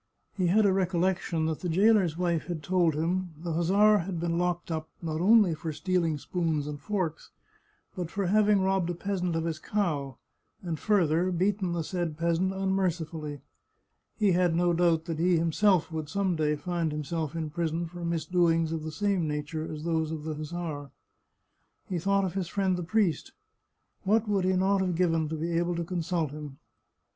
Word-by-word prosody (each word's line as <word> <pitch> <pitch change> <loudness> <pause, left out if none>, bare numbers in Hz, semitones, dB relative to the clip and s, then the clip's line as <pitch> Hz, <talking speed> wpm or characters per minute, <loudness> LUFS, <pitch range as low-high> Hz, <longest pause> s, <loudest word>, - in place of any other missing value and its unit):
He 185 -3 +1
had 210 +5 +4
a - - +5
recollec 185 0 +1
tion 160 -2 -1
that 160 -1 -1
the 180 - -3
jailer's 190 -2 +3
wife 170 -3 0
had 170 -4 -4
told 175 -1 +2
him 175 +2 -1
the 165 +1 -4
hussar 200 +6 +4
had 175 0 -4
been 170 0 -1
locked 175 -1 -1
up, 160 -1 -3
not 160 -1 -3
only 205 -2 +5
for 160 +1 -4
stealing 170 -1 0
spoons 160 -2 -1
and 145 -1 -5
forks, 180 -3 -3 0.7
but 180 -4 -4
for 195 +2 -2
having 205 +1 +4
robbed 190 -2 +1
a 175 - -2
peasant 180 -2 -2
of 165 - 0
his 165 -2 -3
cow, 150 - -2 0.5
and 165 -4 -3
further 180 -4 +2
beaten 185 0 0
the 170 -1 -1
said 170 -2 -3
peasant 170 +3 +1
unmercifully. 170 -6 -2 0.8
He 210 -3 +3
had 175 -1 +2
no 175 0 +2
doubt 165 -1 +2
that 165 -3 -4
he 175 +1 +3
him 165 0 +1
self 185 -2 +3
would 155 -2 -4
some 195 0 0
day 150 -1 +1
find 170 0 -2
himself 150 +1 -3
in 160 -2 -3
prison 165 +1 -1
for 175 +1 -8
misdoings 165 0 +1
ot 160 - -3
the 155 0 -5
same 190 0 0
nature 150 +2 -3
as 155 -1 -6
those 160 -2 0
of 155 -2 -5
the 155 0 -3
hussar. 155 -2 -5 1.0
He 180 -3 -2
thought 195 +3 +2
of 185 - -3
his 190 -3 -2
friend 190 0 0
the 180 - -3
priest. 180 -3 0 0.7
What 215 +3 +2
would 200 -3 +1
he 185 - +2
not 190 +2 +2
have 185 -2 0
given 165 -3 +1
to 160 - -3
be 165 +2 -2
able 175 0 0
to 170 - -2
consult 170 -3 -2
him! 150 -2 -8
170 Hz, 190 wpm, -28 LUFS, 160-185 Hz, 1.0 s, a